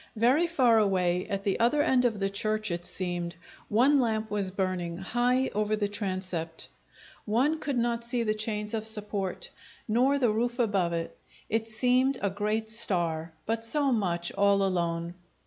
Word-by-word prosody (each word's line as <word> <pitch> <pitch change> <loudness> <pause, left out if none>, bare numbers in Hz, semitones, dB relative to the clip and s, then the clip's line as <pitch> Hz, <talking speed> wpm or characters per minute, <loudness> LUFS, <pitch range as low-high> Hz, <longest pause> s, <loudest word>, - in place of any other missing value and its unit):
Very 255 +10 +3
far 250 -9 +3
away, 180 -3 +1
at 195 0 -3
the 195 -1 0
other 245 +6 +3
end 260 -5 +2
of 220 -4 0
the 195 0 0
church 215 0 -1
it 170 0 -4
seemed, 175 -2 -2 0.3
one 265 +7 +4
lamp 220 -3 -1
was 200 -2 +1
burning, 185 -3 -3
high 245 +7 0
over 210 +1 0
the 210 -1 -1
transept. 185 -5 -3 0.6
One 265 +9 +1
could 280 -4 -2
not 235 0 0
see 240 0 0
the 215 -1 +1
chains 215 0 -1
of 220 -1 +1
support 205 -3 -1 0.4
nor 255 +6 +2
the 245 -5 +2
roof 240 +3 -1
above 200 -8 +1
it; 165 0 -4 0.3
it 225 +1 -1
seemed 250 +4 +2
a 200 - -1
great 210 +2 -2
star, 170 -7 0
but 225 +1 -1
so 280 +4 +2
much 175 -7 0
all 200 0 +3
alone. 170 -2 -1
215 Hz, 165 wpm, -28 LUFS, 190-235 Hz, 0.6 s, one